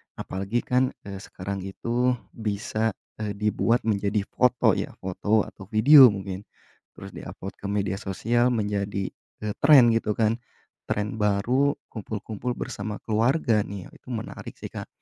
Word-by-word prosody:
Apalagi 100 +5 -2
kan, 125 +1 +1
eee, 100 -1 -7
sekarang 100 0 -6
itu 120 +5 0 0.2
bisa, 110 0 -2 0.2
eee, 105 -2 -3
dibuat 105 +3 +1
menjadi 105 -1 0
foto 125 -1 +3
ya, - - -4
foto 105 +3 +1
atau 95 - -11
video, 130 +6 +9
mungkin 100 -2 -3 0.5
terus - - -9
di-upload 95 - -8
ke 100 - -5
media 100 -1 -1
sosial, 115 +5 +1
menjadi, 100 -3 -1 0.3
eee, 105 -1 -1
tren 140 -5 +7
gitu 110 -2 0
kan. 115 +1 +1 0.5
Tren 105 +1 -1
baru 120 +8 +2 0.2
kumpul-kumpul 110 +2 -4
bersama 105 +1 -4
keluarga 115 +1 +2
nih 100 -2 -7
ya, - - -17
itu - - -22
menarik 110 -2 -6
sih, - - -8
Kak. - - -7
105 Hz, 145 wpm, -26 LUFS, 100-120 Hz, 0.5 s, video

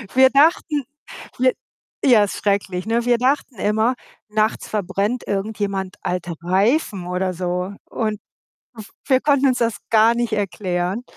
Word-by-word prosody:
wir 260 0 +7
dachten 290 -1 +3 0.5
wi 255 0 +4 0.5
ja, 240 -6 +6
ist 200 - -4
schrecklich, 195 -2 -1
ne? 230 +1 0
Wir 240 -1 +3
dachten 260 -1 0
immer, 220 +5 +1 0.3
nachts 215 +1 0
verbrennt 205 +4 -2
irgendjemand 200 -2 -3
alte 175 -1 -3
Reifen 195 - +1
oder 185 +1 -1
so 180 +2 -3
und 215 -3 -3 0.5
w 220 - -9 0.2
wir 260 -2 +3
konnten 280 -2 +3
uns 255 - +1
das 230 -3 0
gar 225 +1 +5
nicht 235 -1 -2
erklären 190 0 -2
215 Hz, 140 wpm, -21 LUFS, 190-245 Hz, 0.5 s, wir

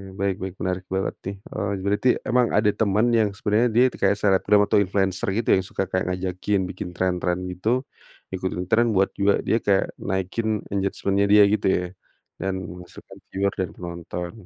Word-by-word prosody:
baik 100 0 -1
baik 95 -1 -5
menarik 90 0 -2
banget 95 +1 -2
nih, 100 - -4
eee, 100 0 -4
berarti 105 +5 +1
memang 125 -1 +2
ada 105 0 +4
teman 105 +3 +1
yang 110 -3 +3
sebenernya 110 +3 +2
dia 120 +2 +4
kayak 100 +1 +1
selebgram 100 0 +3
atau 100 - +3
influencer 95 -1 0
gitu 115 - -1
ya, - - +7
yang 95 - -5
suka 95 - -2
kayak 95 - 0
ngajakin 95 +2 -1
bikin 90 0 -6
tren-tren 90 0 -1
itu, 115 +9 0 0.5
ikutin 95 -1 -3
tren 115 -1 +3
buat 95 +1 +3
juga 100 0 +2
dia 115 - +1
kayak 100 -1 +1
naikin 105 +3 -2
engagement-nya 100 0 0
dia 105 0 +7
gitu 105 - +1
ya, 90 -1 +2 0.5
dan 95 -1 -2
menghasilkan 90 0 -11
viewer 100 +1 -1
dan 95 - -1
penonton. 85 0 -6
100 Hz, 175 wpm, -24 LUFS, 95-105 Hz, 0.5 s, ya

